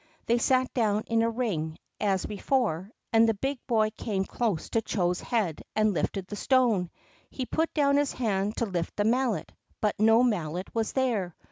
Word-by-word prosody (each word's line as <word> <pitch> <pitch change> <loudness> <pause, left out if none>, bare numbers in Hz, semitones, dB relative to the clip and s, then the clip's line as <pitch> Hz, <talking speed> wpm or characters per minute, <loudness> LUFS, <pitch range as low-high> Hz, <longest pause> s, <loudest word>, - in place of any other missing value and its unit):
They 235 +1 +2
sat 255 +1 +2
down 215 -3 +1
in 230 -1 +1
a 230 - +2
ring, 190 -10 -2 0.2
as 195 -3 +1
before, 210 - -1 0.2
and 225 0 +6
the 225 - +1
big 270 +5 -2
boy 220 -3 +2
came 195 -4 -2
close 215 -9 -1
to 225 - +2
Chô's 180 -4 -1
head 205 -11 -1
and 215 -1 +3
lifted 190 +2 -2
the 205 - -7
stone. 230 -7 +2 0.4
He 260 - -4
put 320 +5 0
down 280 -2 +3
his 290 -1 +2
hand 210 -3 -1
to 235 - +1
lift 175 -5 -3
the 205 - +1
Mallet, 240 +1 +1 0.3
but 210 -2 0
no 225 +2 +5
mallet 180 -6 -1
was 225 -1 -1
there. 225 -10 0
220 Hz, 180 wpm, -28 LUFS, 195-245 Hz, 0.4 s, and